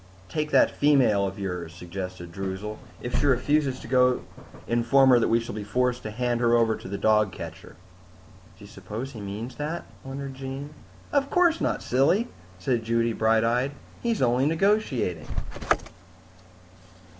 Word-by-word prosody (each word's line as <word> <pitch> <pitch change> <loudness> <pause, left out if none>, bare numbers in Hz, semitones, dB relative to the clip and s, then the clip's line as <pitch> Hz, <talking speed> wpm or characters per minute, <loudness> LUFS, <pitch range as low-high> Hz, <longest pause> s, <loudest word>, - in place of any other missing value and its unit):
"Take 150 -1 -2
that - - +5
female 130 -9 +3
of 95 - -6
yours," 90 -4 -4
suggested 90 0 -7
Droozle. 95 +3 -5 0.2
"If 120 - -1
she 145 - +2
refuses 140 0 +2
to - - -9
go, 125 0 +3 0.4
inform 130 +3 +4
her 125 - +7
that - - +2
we 115 - +3
shall 115 - -6
be 105 0 -4
forced 125 +4 0
to 110 - -5
hand 120 +2 -1
her 120 0 +4
over 115 -1 +3
to - - -10
the 100 +1 -4
dog 105 -1 +3
catcher." - - -9 0.8
"Do - - -13
you - - -12
suppose 120 +6 -7
he 115 -5 -8
means 105 +5 -6
that?" 155 +4 -3 0.2
wondered 135 0 -6
Jean. 135 +2 -6 0.4
"Of 280 -1 +2
course 345 -1 +3
not, - - 0
silly," 160 - +2 0.3
said 115 +5 0
Judy, 115 0 +1
bright 110 0 +3
eyed. 125 +4 +1 0.3
"He's 230 - 0
only 125 +3 +3
negotiating." 160 - +1
120 Hz, 160 wpm, -26 LUFS, 105-140 Hz, 0.8 s, her